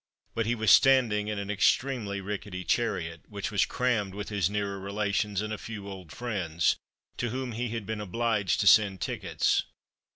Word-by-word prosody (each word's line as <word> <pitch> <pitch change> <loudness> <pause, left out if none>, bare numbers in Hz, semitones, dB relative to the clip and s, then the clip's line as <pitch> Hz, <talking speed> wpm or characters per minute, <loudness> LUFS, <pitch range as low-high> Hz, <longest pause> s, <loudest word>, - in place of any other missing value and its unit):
But 115 -1 -1
he 120 - +1
was 110 -4 +3
standing 115 -3 +5
in 105 -1 -2
an 100 0 -3
extremely 105 -1 +1
rickety 100 -1 -5
chariot, 85 -8 -1
which 100 0 -4
was 100 - +2
crammed 110 -6 0
with 105 0 -5
his 100 -4 +1
nearer 100 -1 -2
relations, 100 0 -1
and 110 0 -3
a 105 - -5
few 105 -3 -7
old 95 -5 -9
friends, 90 -9 0 0.4
to 120 - -1
whom 130 +1 -3
he 120 +1 -3
had 115 -2 -4
been 110 0 -4
obliged 105 -1 0
to - - 0
send 100 -3 +6
tickets. - - 0
105 Hz, 175 wpm, -28 LUFS, 100-115 Hz, 0.4 s, send